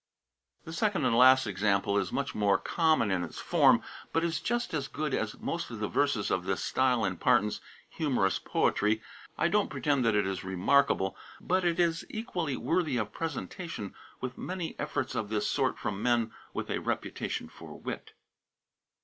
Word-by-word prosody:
The 160 - -8
second 205 +3 +1
and - - +3
last 130 +2 +7
example 100 0 +1
is 95 -2 -2
much 140 0 -2
more 100 -2 +3
common 160 - +2
in 90 -2 +1
its - - -7
form, - - +4 0.3
but 165 - +1
is 165 -2 0
just 240 -4 -1
as 145 -3 -1
good 150 -2 -3
as 110 -1 -1
most 170 - -3
of 115 - -6
the 105 - -1
verses 140 -6 +1
of 90 - +1
this 95 -3 -1
style 125 -4 +2
in 95 -2 -2
Parton's 105 +4 +2 0.3
"Humorous 125 -11 0
Poetry." 110 +2 +1 0.3
I - - +3
don't 205 +4 +2
pretend 145 -4 +1
that 115 -2 +3
it 105 -1 +3
is 95 -1 -3
remarkable, 95 +2 +2 0.2
but 185 +1 +1
it 170 0 +1
is 170 -1 +2
equally 180 - -3
worthy 165 -7 0
of 105 -2 -2
presentation 160 - -5 0.3
with 125 0 -5
many 180 -2 -4
efforts 145 -3 -2
of 105 -2 -2
this 110 -1 0
sort - - +1
from 100 -1 -3
men 120 -1 +2 0.2
with - - -4
a - - 0
reputation - - -3
for - - -11
wit. - - -6
125 Hz, 175 wpm, -30 LUFS, 105-165 Hz, 0.3 s, last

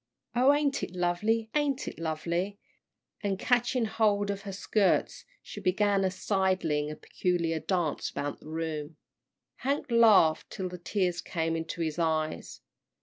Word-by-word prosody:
Oh, 255 +3 +6
ain't 290 -1 +1
it - - -4
lovely, 210 +6 0
ain't 290 -3 0
it - - -6
lovely?" 170 +5 -2 0.6
and 200 -2 -1
catching 245 +2 +1
hold 205 -2 +1
of 200 0 -5
her - - -3
skirts 200 +1 +1 0.2
she - - -8
began 200 +1 +2
a 190 - +2
sidling 185 -6 0
and 155 - -7
peculiar 170 -3 -1
dance 175 -3 -1
about 145 0 -4
the 155 - -12
room. 160 -1 -4 0.6
Hank 280 0 -2
laughed 215 -9 +5
till 190 -3 -4
the 180 0 -8
tears 180 -1 -1
came 165 -1 -2
into 165 +1 -4
his 160 0 -2
eyes. 155 -1 -1
185 Hz, 145 wpm, -29 LUFS, 165-215 Hz, 0.6 s, Oh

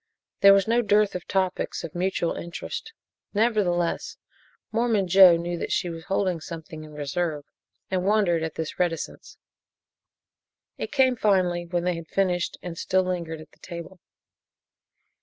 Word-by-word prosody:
There 200 -1 +8
was 195 0 +2
no 235 +2 +3
dearth 210 -2 +3
of 180 -3 -6
topics 190 -1 -1
of 160 - -6
mutual 180 -1 0
interest. 170 - -6 0.4
Nevertheless, 200 -6 +1 0.5
Mormon 225 -4 +1
Joe 180 -1 +8
knew 170 0 -3
that - - -4
she 175 - 0
was 165 0 -8
holding 185 -4 0
something 160 -1 -8
in 155 0 -12
reserve 150 +1 -2 0.5
and 185 -1 0
wondered 195 -5 +2
at 160 -1 -4
this 160 -1 -5
reticence. 175 -2 -3 1.4
It - - -4
came 265 -3 +4
finally 180 -6 +1
when 175 0 -1
they 180 0 +1
had 165 -1 -8
finished 180 -2 0
and 170 -2 -6
still 185 0 +2
lingered 170 -3 -3
at 155 - -15
the - - -25
table. 170 +1 -9
180 Hz, 150 wpm, -25 LUFS, 170-195 Hz, 1.4 s, There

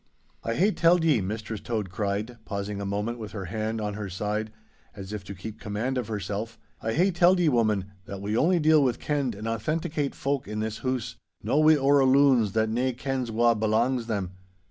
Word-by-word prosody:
'I 115 - -1
hae 200 +5 +3
telled 170 -2 +4
ye,' 150 -9 +3
Mistress 105 +2 -4
Tode 110 -6 -3
cried, 105 +4 -3
pausing 100 -1 -4
a 100 - -3
moment 105 +4 -2
with 110 -2 -7
her 100 -3 -5
hand 110 +4 -3
on 105 -1 -2
her 105 -1 -5
side, 105 +3 -3 0.4
as 100 0 -8
if 105 -2 -5
to 100 - -7
keep 110 +4 -8
command 110 +6 -2
of 125 -4 -2
herself, 105 +1 -4 0.2
'I 110 - -1
hae 185 +5 +3
telled 180 +1 +4
ye, 170 -3 +4
woman, 105 -6 +1
that 100 - -7
we 105 +2 -2
only 175 +8 +3
deal 155 -1 +5
with 125 -3 +1
kenned 140 -6 -1
and 105 +3 -6
authenticate 150 +4 -2
folk 140 -4 -2
in 105 +1 -4
this 110 0 -2
hoose—no 130 +3 -3
wi' 155 0 +6
orra 140 -1 +4
loons, 130 -6 +4
that 110 0 +2
nane 125 +2 0
kens 130 -1 -2
wha 115 +1 +3
belangs 115 +3 +1
them! 100 -5 -2
115 Hz, 200 wpm, -27 LUFS, 105-135 Hz, 0.4 s, wi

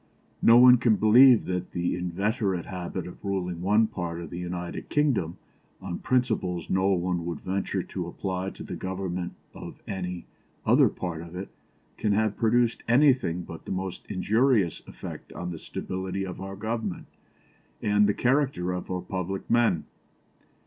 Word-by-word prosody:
No 115 - +7
one 125 0 +9
can 115 -2 +3
believe 120 +4 +7
that 90 0 -3
the 85 0 0
inveterate 95 +2 -1
habit 90 -1 -5
of 90 - -11
ruling 90 -4 -2
one 105 +4 +4
part 85 -5 -4
of 85 - -8
the 85 - -5
United 90 0 -5
Kingdom 130 - +1 0.4
on 95 -2 -5
principles 110 -9 0
which - - -17
no 95 +1 +2
one 90 -1 -1
would 85 -3 -4
venture 95 +1 -2
to - - -5
apply 95 0 -3
to - - -10
the - - -6
government 90 -2 -4 0.2
of - - -9
any 90 -2 -4 0.4
other - - +5
part 85 -3 -5
of 85 +1 -10
it, 95 +2 -5 0.5
can 105 - +1
have 110 0 +1
produced 115 +1 +2
anything 125 - +3
but 85 -1 -10
the - - -6
most 95 -1 -4
injurious 105 - +2
effect - - -9
on 90 0 -5
the 80 - -6
stability 95 +3 -4
of 90 0 -7
our 95 0 -6
Government 110 -2 -3 0.7
and 105 0 +3
the 105 - +1
character 130 -9 +1
of 90 0 -4
our 90 -1 -2
public 95 +1 -4
men. 115 -9 +3
95 Hz, 165 wpm, -27 LUFS, 90-110 Hz, 0.7 s, one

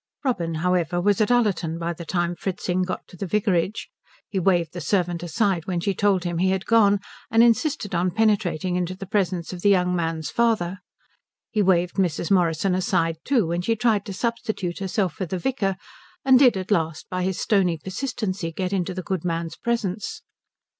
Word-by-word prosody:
Robin, 170 -11 0
however, 175 0 +1
was 200 +3 +2
at 215 - +2
Ullerton 195 -9 +1
by 170 0 -2
the 170 0 -9
time 175 +1 -1
Fritzing 185 +1 -2
got 185 0 -3
to - - -14
the 190 +2 -5
vicarage. 195 0 0 0.4
He 195 - -2
waved 175 -2 +2
the 175 - -5
servant 175 +1 0
aside 180 0 0
when 180 -2 -1
she 195 +3 0
told 195 -2 +2
him 175 -2 -2
he 185 +1 +3
had 190 0 -1
gone, 205 -3 +4 0.3
and 225 +1 +5
insisted 235 - +1
on 180 +1 +1
penetrating 190 -4 +1
into 180 0 -1
the 195 - -7
presence 185 -3 -1
of 180 - -7
the 205 - +4
young 180 -2 +3
man's 165 -3 -2
father. 210 -6 +1 0.7
He 215 - +1
waved 180 -2 +2
Mrs. 175 -1 0
Morrison 180 0 +2
aside 180 -4 +1
too 255 -8 +2
when 170 +2 -1
she 225 +5 +1
tried 215 -3 +2
to 195 - -4
substitute 215 -4 -2
herself 195 -2 -1
for 185 - -4
the 185 - -3
vicar, 195 -2 -1 0.5
and 260 -1 +7
did 250 -7 +5
at 190 +2 -5
last 165 -4 0
by 185 0 -3
his 185 0 -1
stony 185 -5 +2
persistency 190 - -3
get 185 +3 -3
into 185 -1 -1
the 185 - -4
good 185 -1 -3
man's 165 -1 -2
presence. 215 -4 -3
185 Hz, 190 wpm, -24 LUFS, 175-205 Hz, 0.7 s, and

